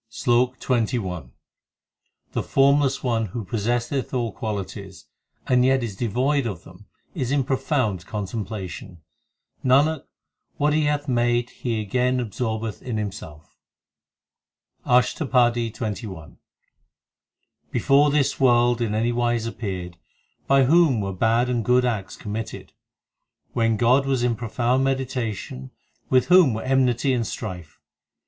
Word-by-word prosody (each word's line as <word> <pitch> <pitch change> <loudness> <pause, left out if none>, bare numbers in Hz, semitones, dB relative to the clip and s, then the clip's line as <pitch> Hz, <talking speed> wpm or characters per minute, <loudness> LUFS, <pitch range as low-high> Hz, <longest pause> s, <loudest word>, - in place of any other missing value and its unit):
SLOK 125 +2 +1
XXI 115 - -1 1.0
The - - -1
Formless 140 0 +2
One 115 -3 0
who 110 +3 -6
possesseth 120 +5 -2
all 120 -3 -1
qualities, 100 -5 -6 0.4
and 125 -1 +3
yet 130 0 +3
is 110 -4 -4
devoid 125 +5 0
of 95 -6 -6
them 95 +3 -16 0.3
is 130 -7 -3
in 140 -1 +2
profound 130 - -1
contemplation; 100 -4 -6 0.6
Nanak, 140 +4 +3 0.5
what 150 +1 +2
He 155 0 +2
hath 145 0 -1
made 120 -1 +1
He 115 -3 -3
again 125 +5 0
absorbeth 110 -2 -3
in 120 -4 -4
Him 105 -2 -2
self. 80 -6 -12 1.3
ASHTAPADI 125 -2 +2
XXI 105 -3 -4 0.3
x - - -17
i - - -26 1.3
Before 145 +2 +4
this 145 -1 +1
world 120 -2 +3
in 110 -2 -1
any 115 +2 +1
wise 120 -1 0
appeared, 95 -6 -5 0.5
By 135 0 +5
whom 150 -3 +4
were 95 -1 -3
bad 115 +6 +2
and 120 -2 -1
good 125 +3 +3
acts 105 -6 -2
committed? 110 +1 -6 0.8
When 115 -2 +1
God 125 +5 +3
was 130 -3 +1
in 120 -1 +1
profound 120 +2 0
meditation, 125 - -3 0.4
With 130 -1 +4
whom 180 -10 +5
were 110 - -4
enmity 130 0 +2
and 115 -3 -1
strife? 90 - -7
120 Hz, 130 wpm, -23 LUFS, 110-130 Hz, 1.3 s, By